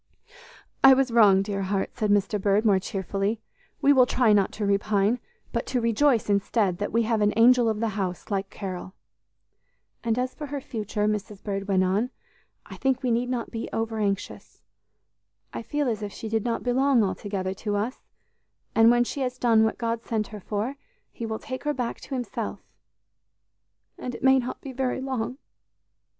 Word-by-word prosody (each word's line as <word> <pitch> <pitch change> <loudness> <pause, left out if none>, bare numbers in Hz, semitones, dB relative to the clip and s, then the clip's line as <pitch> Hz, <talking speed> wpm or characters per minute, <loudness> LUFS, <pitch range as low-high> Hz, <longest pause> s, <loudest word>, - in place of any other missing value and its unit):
"I 270 0 +9
was 265 -2 +1
wrong, 205 -4 +6
dear 195 -1 -3
heart," 195 0 -1
said 215 -4 -1
Mr. 205 0 +2
Bird 205 +2 +2
more 200 -3 +4
cheerfully; 195 +3 -2 0.4
"we 285 +1 +6
will 255 -2 +5
try 245 -4 +3
not 200 -2 +3
to 210 - -3
repine, 200 +3 +2 0.3
but - - -2
to 255 - 0
rejoice 230 +2 +2
instead, 200 -2 +1
that 205 - -2
we 230 +1 +2
have 225 -1 0
an 205 0 +3
'angel 240 0 +6
of 215 -1 -1
the 230 0 0
house' 195 -2 -4
like 195 -1 -1
Carol." 185 -1 -6 1.1
"And 230 -1 0
as 255 +1 -1
for 300 - -7
her 285 0 -4
future," 215 -4 -3
Mrs. 210 -1 -3
Bird 195 -1 -3
went 190 -2 +3
on, 200 +7 +1 0.6
"I - - -10
think 265 -1 0
we 250 - +1
need 240 +2 0
not 245 -2 -3
be 225 - -4
over 225 0 -2
anxious. 200 -2 -3 0.9
I - - -4
feel 290 +4 -1
as 220 -3 -1
if 205 -1 -4
she 220 - -7
did 220 -1 0
not 235 -1 -2
belong 255 -1 +3
altogether 190 -1 -2
to 205 +1 -3
us, 220 +6 -2 0.7
and 225 0 +6
when 240 0 +5
she 275 +3 -4
has 255 -1 -2
done 230 -3 +4
what 220 - 0
God 230 -1 -2
sent 215 -2 -2
her 210 - -8
for, 215 +7 -3 0.3
He 230 - -6
will 220 0 -3
take 255 +2 -7
her 295 -1 -1
back 245 -2 -3
to 270 - -6
Himself 245 -2 -4 1.4
and 250 - -5
it - - -10
may 265 0 +6
not 250 0 -5
be 275 - -7
very 260 0 -1
long!" 260 -2 -3
225 Hz, 190 wpm, -26 LUFS, 205-250 Hz, 1.4 s, I